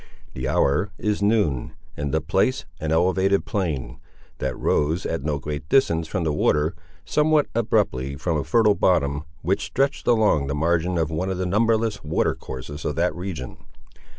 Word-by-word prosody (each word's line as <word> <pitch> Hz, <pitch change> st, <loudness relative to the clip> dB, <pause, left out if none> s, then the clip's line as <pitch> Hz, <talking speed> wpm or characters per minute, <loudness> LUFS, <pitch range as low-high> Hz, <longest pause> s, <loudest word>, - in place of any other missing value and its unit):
The 65 Hz, +1 st, -3 dB
hour 70 Hz, +9 st, +2 dB
is 105 Hz, -1 st, -1 dB
noon, 100 Hz, -, +1 dB, 0.2 s
and 70 Hz, -1 st, -3 dB
the 80 Hz, -, +1 dB
place 95 Hz, +11 st, +1 dB
an 80 Hz, -1 st, -2 dB
elevated 95 Hz, +4 st, +2 dB
plain, 80 Hz, -, -3 dB, 0.4 s
that 65 Hz, -1 st, -2 dB
rose, 80 Hz, +5 st, 0 dB
at 80 Hz, -, -2 dB
no 75 Hz, +1 st, -1 dB
great 75 Hz, +1 st, -6 dB
distance 85 Hz, -12 st, +3 dB
from 90 Hz, +1 st, -2 dB
the 80 Hz, -2 st, 0 dB
water, 75 Hz, +1 st, +2 dB, 0.3 s
somewhat 150 Hz, -, +3 dB
abruptly 105 Hz, -, 0 dB
from 85 Hz, +4 st, -1 dB
a 75 Hz, -, 0 dB
fertile 110 Hz, -3 st, +4 dB
bottom, 75 Hz, -7 st, +1 dB, 0.2 s
which 95 Hz, +4 st, 0 dB
stretched 135 Hz, +1 st, -1 dB
along 110 Hz, -, +3 dB
the 70 Hz, -, -2 dB
margin 85 Hz, +3 st, +1 dB
of 80 Hz, -1 st, 0 dB
one 90 Hz, +4 st, -2 dB
of 95 Hz, -, -2 dB
the 95 Hz, -, -1 dB
numberless 110 Hz, +2 st, +1 dB
water 75 Hz, +2 st, +1 dB
courses 70 Hz, +3 st, -8 dB
of 75 Hz, -, -2 dB
that 90 Hz, +2 st, +1 dB
region. 90 Hz, -8 st, -6 dB
85 Hz, 170 wpm, -23 LUFS, 75-100 Hz, 0.4 s, fertile